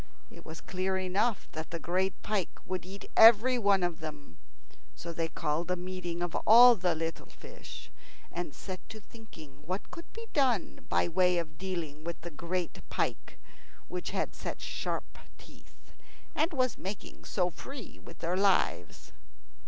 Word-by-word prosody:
It - - -13
was 160 0 -8
clear 190 +1 -1
enough 190 +4 0
that 160 -1 -5
the 165 - -3
great 185 +3 0
pike 205 -4 -1
would 185 -1 -3
eat 195 +1 -8
everyone 225 -3 +7
of 175 -2 -1
them. 150 - -8 0.6
So 170 0 -6
they 165 0 -1
called 160 +2 -2
a 180 - +2
meeting 175 -1 -4
of 175 -1 -3
all 240 +3 +10
the 180 -4 +1
little 165 0 -3
fish, - - -11 0.4
and 175 -3 -4
set 185 +5 -7
to 220 - -8
thinking 160 -12 -14
what 185 +3 -3
could 340 -1 -9
be 460 0 -8
done 255 - +1
by - - +3
way 180 +1 +3
of 155 -3 -4
dealing 170 -6 -4
with 170 -1 -4
the 170 +1 -7
great 170 +3 -3
pike, - - -2 0.5
which - - -3
had - - -1
such - - -5
sharp - - -4 0.2
teeth - - -17 0.6
and 325 +1 +2
was 255 -5 0
making 195 +2 -6
so 180 -2 0
free 260 - -9
with 170 - -12
their 175 +2 +1
lives. 195 0 +1
180 Hz, 160 wpm, -31 LUFS, 170-205 Hz, 0.6 s, all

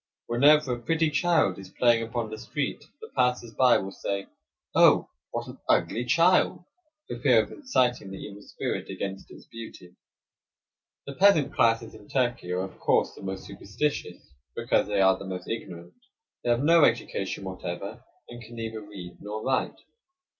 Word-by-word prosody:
Whenever 140 +3 +4
a 120 - -4
pretty 160 +2 +1
child 155 - +2
is 95 -1 -10
playing 120 +2 +3
upon 115 -1 -3
the 110 - -5
street 140 +5 -4 0.2
the 445 - -9
passers 125 -2 +1
by 125 +2 +5
will 95 - -5
say: 100 0 -3 0.5
"Oh, - - +5 0.2
what - - -4
an - - -10
ugly 120 +2 +2
child!" 170 +6 +3 0.4
for - - -6
fear - - +5
of - - -12
inciting 125 - 0
the 95 - -7
evil 100 0 -9
spirit - - -4
against 95 0 -5
its - - -14
beauty. 110 -6 -11 1.1
The 140 - -6
peasant 160 -6 +4
classes 115 0 +2
in 105 - -14
Turkey 120 -8 -1
are 90 +1 0
of 95 - -7
course - - +2
the - - -13
most 95 -1 -5
superstitious 100 - -4 0.2
because - - +1
they 100 -1 +1
are 95 0 +4
the - - -8
most 90 -1 -6
ignorant. 90 -6 -6 0.5
They 120 - -1
have 120 +2 +2
no 165 +1 +6
education 100 -5 0
whatever, 90 -2 -6 0.2
and 120 0 -10
can 120 +1 -12
neither 110 -1 -5
read 95 -4 -10
nor 105 +1 -5
write. 130 -1 -1
115 Hz, 170 wpm, -27 LUFS, 95-130 Hz, 1.1 s, no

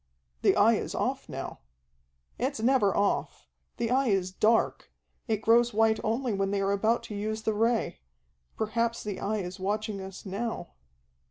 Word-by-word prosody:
"The - - +4
Eye - - +5
is - - -4
off - - -2
now." - - -6 0.8
"It's 260 0 -1
never 230 -4 +3
off. 200 0 0 0.3
The 235 0 -1
Eye 265 +1 +3
is 190 -3 +1
dark. 220 +4 +1 0.4
It 220 -2 -1
grows 235 0 +4
white 220 0 +3
only 230 +2 0
when 195 0 0
they 200 0 0
are 195 0 +1
about 220 +4 +1
to 210 - -7
use 215 +2 -3
the 220 - +1
Ray. 225 +2 +1 0.6
Perhaps 230 +2 -1
the 205 -2 -4
Eye 215 +2 -1
is 180 +1 -7
watching 205 +1 -2
us 190 +1 -9
now." 215 +4 -4
220 Hz, 165 wpm, -28 LUFS, 200-230 Hz, 0.8 s, Eye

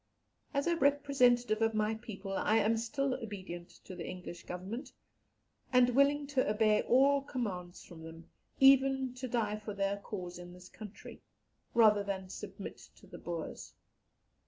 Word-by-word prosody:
As 280 -1 0
a 340 - +2
representative 255 -6 +3
of 225 -1 +2
my 215 +1 +1
people, 215 -4 -7
I 210 +2 +1
am 225 +1 +3
still 270 +4 -1
obedient 190 -7 -7 0.2
to 185 - -8
the - - -6
English 180 -1 -8
Government, 195 +9 -6 0.8
and 250 -1 +5
willing 280 +3 +3
to 275 -5 0
obey 215 0 +3
all 275 +3 +4
commands 195 -10 -5
from 170 -3 -12
them, 165 +1 -11 0.3
even 270 -1 +5
to 255 +1 -6
die 220 -3 -1
for 210 -1 -7
their 200 0 0
cause 180 -4 -7
in 175 0 -10
this 180 0 -13
country, 215 -2 -11 0.5
rather 215 -3 +6
than 190 -2 -4
submit 200 0 -8 0.2
to - - -18
the - - -11
Boers. 170 -2 -6
215 Hz, 155 wpm, -33 LUFS, 190-260 Hz, 0.8 s, rather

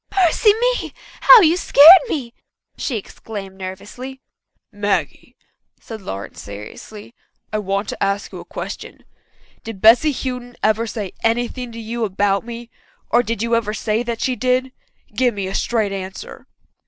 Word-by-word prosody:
"Mercy 415 +6 +4
me, - - -1 0.3
how - - +9
you 335 -2 +4
scared 340 +1 +8
me!" 250 - -4 0.4
she 250 - -3
exclaimed 200 -1 -8
nervously. 205 +8 -8 0.5
"Maggie," 205 - -2 0.4
said 220 -2 -9
Lawrence 100 - -7
seriously, 105 - -10 0.4
"I 215 - 0
want 200 0 -2
to - - -3
ask 200 +1 -1
you - - -8
a - - -9
question. - - -8 0.6
Did 225 -4 -8
Bessy 230 +9 +6
Houghton 250 -2 -5
ever 220 +2 +2
say 210 -4 -5
anything 240 +2 -1
to 230 - -8
you 230 +1 -4
about 200 -1 0
me 235 0 -9 0.4
or 240 - +5
did 230 -2 -3
you 235 0 +1
ever 220 -2 -1
say 215 +2 -1
that 235 -1 -4
she 255 - 0
did? 255 +3 0 0.4
Give 245 0 +1
me 200 -1 -3
a 190 - -5
straight 220 -1 0
answer." 190 -1 -8
225 Hz, 155 wpm, -20 LUFS, 200-250 Hz, 0.6 s, how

